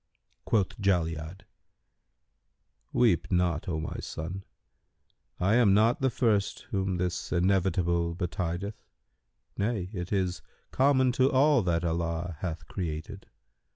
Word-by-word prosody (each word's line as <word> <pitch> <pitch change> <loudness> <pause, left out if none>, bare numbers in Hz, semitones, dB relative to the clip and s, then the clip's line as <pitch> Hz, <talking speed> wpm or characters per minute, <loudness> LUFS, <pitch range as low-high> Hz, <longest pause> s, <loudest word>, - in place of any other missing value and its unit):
Quoth 105 -1 0
Jali'ad, 85 -2 0 1.5
"Weep 115 -8 +3
not, 90 0 +1
O 80 -2 -1
my 80 - -4
son; 90 +5 -6 1.0
I 95 +4 +2
am 115 -5 +5
not 115 +5 +3
the 130 - +3
first 110 -5 +1
whom 95 -2 0
this 90 0 -2
Inevitable 85 -2 +1
betideth; 90 +3 -3 0.8
nay, 100 -3 -1
it 90 -2 -5
is 95 -3 0 0.3
common 130 -1 +3
to 130 +2 +2
all 140 0 +4
that 85 -2 0
Allah 85 0 -2
hath 80 -4 -5
created. 90 +3 -5
90 Hz, 115 wpm, -28 LUFS, 85-105 Hz, 1.5 s, am